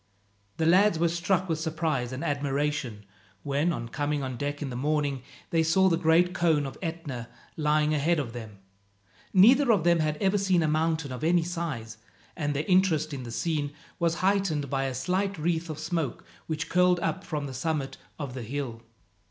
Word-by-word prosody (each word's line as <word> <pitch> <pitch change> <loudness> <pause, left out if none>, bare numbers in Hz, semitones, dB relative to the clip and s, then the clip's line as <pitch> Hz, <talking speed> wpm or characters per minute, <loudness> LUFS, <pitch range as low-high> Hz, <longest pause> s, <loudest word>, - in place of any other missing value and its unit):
The 160 - +1
lads 185 +2 +5
were 170 +1 +2
struck 175 +2 0
with 160 -2 -1
surprise 155 -6 -1
and 130 +2 -5
admiration 140 -6 -2 0.4
when, 145 +4 +1
on 120 -7 -4
coming 145 +3 -2
on 130 -1 -4
deck 145 +3 -3
in 140 -3 -4
the - - -5
morning, 145 0 0 0.3
they 165 - +3
saw 190 +4 +4
the 170 - +3
great 170 +2 +3
cone 160 -5 +2
of 135 - -6
Etna 155 -9 -5 0.3
lying 150 0 +2
ahead 155 +3 +2
of 125 -6 -3
them. 110 -4 -8 0.7
Neither 245 +7 +6
of 200 -7 +3
them 170 0 +4
had 155 -1 0
ever 195 +4 +2
seen 185 -3 +2
a - - +2
mountain 160 -1 0
of 125 +3 -6
any 170 +1 +3
size, 155 -11 -4 0.4
and 145 -3 -2
their 145 +2 -1
interest 180 -5 +3
in 135 - -4
the 120 - -7
scene 145 +4 -1 0.3
was 170 -1 +1
heightened 190 -8 +1
by 135 -1 0
a 130 -1 -3
slight 190 +7 -1
wreath 165 +1 -1
of 155 - -4
smoke, 155 -3 -3 0.2
which 155 -1 -3
curled 180 0 +3
up 190 - -1
from 150 -5 -3
the 135 - -6
summit 135 0 -2 0.2
of 140 -5 -5
the 130 - -5
hill. 120 -1 -4
155 Hz, 190 wpm, -27 LUFS, 140-170 Hz, 0.7 s, Neither